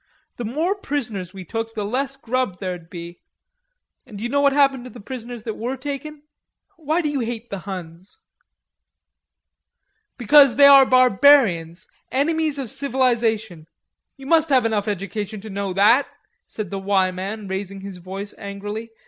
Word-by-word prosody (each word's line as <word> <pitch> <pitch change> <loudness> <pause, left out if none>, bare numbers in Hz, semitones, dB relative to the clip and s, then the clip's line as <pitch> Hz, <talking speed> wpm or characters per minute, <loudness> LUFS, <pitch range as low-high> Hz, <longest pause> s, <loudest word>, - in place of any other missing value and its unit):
The 240 - -4
more 310 - 0
prisoners 240 - -4
we 190 -1 -10
took, 225 +5 -5
the 210 -2 -2
less 265 +5 -2
grub 255 -7 -2
there'ld 180 -3 -6
be; 170 0 -9 0.8
and 210 - -12
do 205 - -7
you 240 - -3
know 285 - +2
what 280 -1 +4
happened 275 -2 +2
to - - -8
the 245 - -12
prisoners 240 0 -8
that 220 -2 -5
were 250 +4 -3
taken? 290 +2 -6 0.5
Why 320 +2 -1
do 300 - 0
you 290 -2 -2
hate 235 -1 -5
the 200 - -4
Huns?" 180 - -9 2.0
"Because 275 +2 +6
they 285 - +7
are 275 -1 +8
barbarians, 245 - +4 0.2
enemies 310 +2 0
of 265 -5 -3
civilization. 230 - -1 0.5
You 270 - -12
must 320 +2 +3
have 260 -4 +3
enough 220 -2 0
education 205 +1 -4
to 215 0 -9
know 200 0 -3
that," 210 +9 +4 0.4
said 210 -5 -6
the 195 - -3
"Y" 190 -1 +1
man, 195 +3 -6
raising 195 0 -5
his 195 -1 -8
voice 195 +3 -7
angrily. 205 +3 -6
225 Hz, 160 wpm, -22 LUFS, 195-275 Hz, 2.0 s, are